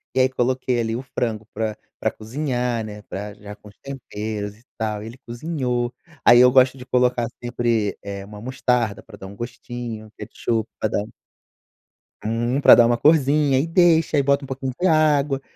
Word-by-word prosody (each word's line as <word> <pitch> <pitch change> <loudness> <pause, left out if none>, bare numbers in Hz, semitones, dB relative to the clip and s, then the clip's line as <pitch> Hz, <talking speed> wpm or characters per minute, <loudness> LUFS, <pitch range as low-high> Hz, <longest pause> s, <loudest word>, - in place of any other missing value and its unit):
e - - +2
aí 130 0 +4
coloquei 130 -1 0
ali 115 0 -1
o 125 - -3
frango 115 -4 -3
pra 110 -1 -2 0.2
pra - - 0
cozinhar, 125 0 -2
né, 105 -1 -8
para 105 +2 -6
já 105 0 -10
com 105 - -17
os 100 - -21
temperos 105 -6 -5
e 115 - -25
tal 105 -2 -3
ele 115 +3 -9
cozinhou 125 -2 -2 0.3
aí 120 0 +8
eu 125 0 +7
gosto 130 0 +4
de 125 - -10
colocar 125 -2 +1 0.2
sempre, 120 -4 0
eh, 100 -1 -6
uma 105 +1 -11
mostarda 120 -3 -1
para 110 -3 -13
dar 95 - -9
um 100 - -11
gostinho, 120 -1 -7
ketchup 115 -2 -2 0.2
dá 110 - +2
para - - 0
dar 110 - -12 1.1
uhum, 120 +5 0
pra - - +9
dar 120 - +6
uma 120 0 +2
corsinha 145 0 +4
e 150 - +1
deixa 165 -2 +3
e 140 - +5
bota 140 +1 +2
um - - -12
pouquinho 130 0 -4
de 180 - 0
água 150 -4 +3
120 Hz, 190 wpm, -22 LUFS, 110-135 Hz, 1.1 s, pra